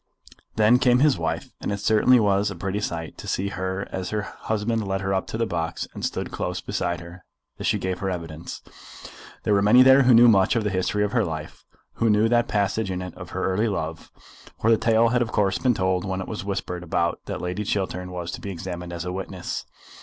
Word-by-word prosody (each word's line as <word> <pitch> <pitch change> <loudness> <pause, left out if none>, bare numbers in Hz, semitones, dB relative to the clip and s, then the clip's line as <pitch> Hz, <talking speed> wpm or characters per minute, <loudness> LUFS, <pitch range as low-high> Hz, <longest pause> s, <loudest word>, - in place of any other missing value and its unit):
Then 110 +3 +5
came 125 -1 +4
his 140 - +3
wife, 80 0 -3
and - - -2
it 100 - -1
certainly 110 +4 +4
was 100 -1 +2
a 100 - -6
pretty 95 +3 -3
sight 85 -5 -4
to - - -8
see 100 +1 -1
as 95 -1 -4
her 105 -1 -2
husband 110 +1 -2
led 95 0 -1
her 95 0 -1
up 95 - -1
to - - -4
the 115 - +1
box 85 -5 -3
and - - -8
stood - - -3
close - - -3
beside 85 -1 -2
her 85 0 -12 0.4
as - - -2
she - - +2
gave 95 -1 -3
her 95 - -2
evidence. 85 -2 -6 0.8
There 105 - +2
were 100 - +4
many 110 +5 +7
there 130 +1 +7
who 125 -2 +6
knew 120 +1 +8
much 100 -3 +4
of 115 - +1
the 105 - -1
history 95 +2 0
of 105 - -1
her 115 -1 +2
life, 80 -4 -6 0.3
who 115 - +2
knew 105 +1 +4
that 120 0 +3
passage 100 0 0
in 90 -1 -2
it 90 -1 -6
of - - -10
her - - -2
early 105 +5 +1
love, 80 -6 -4 0.5
for 115 - +3
the 115 - +5
tale 115 0 +3
had 120 +1 +1
of 120 - -1
course 95 -2 +1
been 125 -3 +2
told 95 -1 0
when 95 -2 -3
it 95 - -5
was 110 - -5
whispered 95 -3 -3
about 85 0 -1
that - - -4
Lady 90 +4 -3
Chiltern 95 -3 -2
was 90 -1 -5
to - - -7
be 100 - -5
examined 90 -1 -6
as 85 0 -5
a 90 - -3
witness. 95 -1 -5
95 Hz, 235 wpm, -24 LUFS, 90-110 Hz, 0.8 s, knew